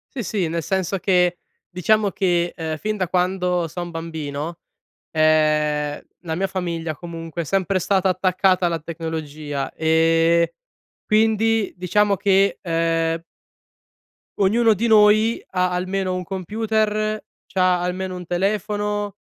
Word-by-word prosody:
Sì, 245 Hz, -, -3 dB
sì. 190 Hz, -2 st, -1 dB
Nel 165 Hz, +1 st, -2 dB
senso 190 Hz, +1 st, -1 dB
che 180 Hz, -1 st, +2 dB, 0.3 s
diciamo 205 Hz, +3 st, +2 dB
che, 175 Hz, -3 st, 0 dB
ehm, 160 Hz, -2 st, -4 dB
fin 215 Hz, +8 st, -2 dB
da 185 Hz, -3 st, -2 dB
quando 180 Hz, -1 st, 0 dB
son 175 Hz, +2 st, -6 dB
bambino, 160 Hz, -1 st, -5 dB, 0.5 s
ehm, 150 Hz, -1 st, +2 dB, 0.2 s
la 165 Hz, -3 st, -3 dB
mia 190 Hz, +4 st, 0 dB
famiglia 170 Hz, -4 st, -3 dB
comunque, 165 Hz, 0 st, -6 dB
è -, -, -6 dB
sempre 190 Hz, +3 st, 0 dB
stata 190 Hz, +1 st, +1 dB
attaccata 185 Hz, 0 st, +2 dB
alla 165 Hz, -1 st, -1 dB
tecnologia. 155 Hz, -3 st, -5 dB
Ehm, 165 Hz, +1 st, +3 dB, 0.6 s
quindi, 220 Hz, -1 st, +2 dB
diciamo 200 Hz, +3 st, +2 dB
che, 195 Hz, +1 st, +2 dB
ehm, 165 Hz, -1 st, 0 dB, 1.2 s
ognuno 225 Hz, +4 st, +4 dB
di 220 Hz, +4 st, -1 dB
noi, 215 Hz, +1 st, +4 dB
ha 180 Hz, -1 st, +1 dB
almeno 185 Hz, +1 st, -1 dB
un 185 Hz, 0 st, -3 dB
computer, 215 Hz, +3 st, -1 dB, 0.2 s
c'ha 185 Hz, -1 st, +2 dB
almeno 185 Hz, +1 st, -3 dB
un 180 Hz, -, -7 dB
telefono, 205 Hz, +2 st, -1 dB
180 Hz, 125 wpm, -22 LUFS, 165-200 Hz, 1.2 s, ognuno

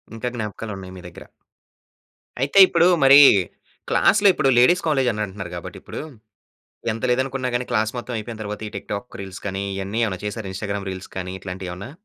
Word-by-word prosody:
ఇంకా 115 Hz, +2 st, -4 dB
జ్ఞాపకాలున్నాయి 105 Hz, -4 st, -6 dB
మీ -, -, -13 dB
దగ్గర. 85 Hz, -, -13 dB, 1.2 s
అయితే 140 Hz, +9 st, +3 dB
ఇప్పుడు 170 Hz, 0 st, +3 dB, 0.2 s
మరి 135 Hz, +1 st, +9 dB, 0.7 s
క్లాస్‌లో 205 Hz, 0 st, +4 dB
ఇప్పుడు 135 Hz, -, +1 dB
లేడీస్ 150 Hz, +9 st, +5 dB
కాలేజ్ 135 Hz, -5 st, +2 dB
అని 105 Hz, -1 st, -4 dB
అంటున్నారు 95 Hz, -3 st, -8 dB
కాబట్టి 85 Hz, -, -8 dB
ఇప్పుడు, -, -, -8 dB, 0.9 s
ఎంత 110 Hz, -, -7 dB
లేదనుకున్న 130 Hz, 0 st, -1 dB
గాని 120 Hz, +1 st, -1 dB
క్లాస్ 110 Hz, -2 st, +1 dB
మొత్తం 120 Hz, 0 st, -6 dB
అయిపోయిన 110 Hz, +1 st, -7 dB
తరువాత 105 Hz, +1 st, -6 dB
ఈ -, -, -12 dB
టిక్ 100 Hz, -, -9 dB
టాక్ 105 Hz, +4 st, -6 dB
రీల్స్ 95 Hz, -1 st, -8 dB
కానీ, 95 Hz, 0 st, -3 dB
ఇయన్నీ 100 Hz, +4 st, -3 dB
ఏమైనా 95 Hz, -4 st, -4 dB
చేసారా 105 Hz, -1 st, -5 dB
ఇ‌న్‌స్టాగ్రామ్ 100 Hz, 0 st, -4 dB
రీల్స్ 95 Hz, 0 st, -8 dB
కానీ 90 Hz, 0 st, -4 dB
ఇట్లాంటియేమన్నా? 90 Hz, +2 st, -7 dB
105 Hz, 170 wpm, -22 LUFS, 95-125 Hz, 1.2 s, మరి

